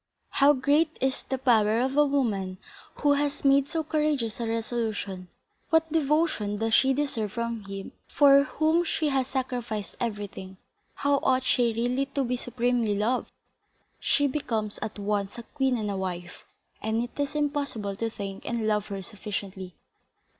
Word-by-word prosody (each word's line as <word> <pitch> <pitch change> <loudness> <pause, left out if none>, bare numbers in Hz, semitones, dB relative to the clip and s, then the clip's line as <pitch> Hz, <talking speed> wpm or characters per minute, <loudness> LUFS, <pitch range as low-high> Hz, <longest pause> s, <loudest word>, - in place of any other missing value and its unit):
How 285 +1 +5
great 295 +4 +2
is 265 0 0
the 265 - -3
power 225 -4 +3
of 260 +2 0
a 295 0 +5
woman 205 -10 0 0.5
who 290 -1 +5
has 285 0 -1
made 275 0 +4
so 325 -1 -1
courageous 300 -8 0
a 230 - -2
resolution! 220 -5 -2 0.4
What 320 -1 +2
devotion 300 -9 +1
does 225 +1 -1
she 265 +3 +5
deserve 260 -7 -1
from 235 -3 -3
him 195 0 -7 0.2
for 280 -1 +6
whom 315 +5 +2
she 315 -2 0
has 265 -2 +1
sacrificed 245 -6 -3
everything! 205 -4 -5 0.4
How 285 0 +2
ought 260 0 +2
she 245 -2 +2
really 245 +4 0
to 280 - +2
be 250 0 -1
supremely 240 -3 0
loved! 235 +5 0 0.7
She 285 - +2
becomes 230 -7 -2
at 215 0 -4
once 205 +1 -2
a 235 - -6
queen 265 -1 0
and 210 -2 -2
a 195 - -3
wife, 180 -2 -5 0.4
and 220 +2 0
it 245 - -6
is 285 +1 -1
impossible 285 -9 -1
to 225 +1 -1
thank 195 -3 -6
and 235 -2 -2
love 210 -1 +1
her 195 -2 -5
sufficiently. 195 -3 -6
240 Hz, 160 wpm, -27 LUFS, 210-280 Hz, 0.7 s, for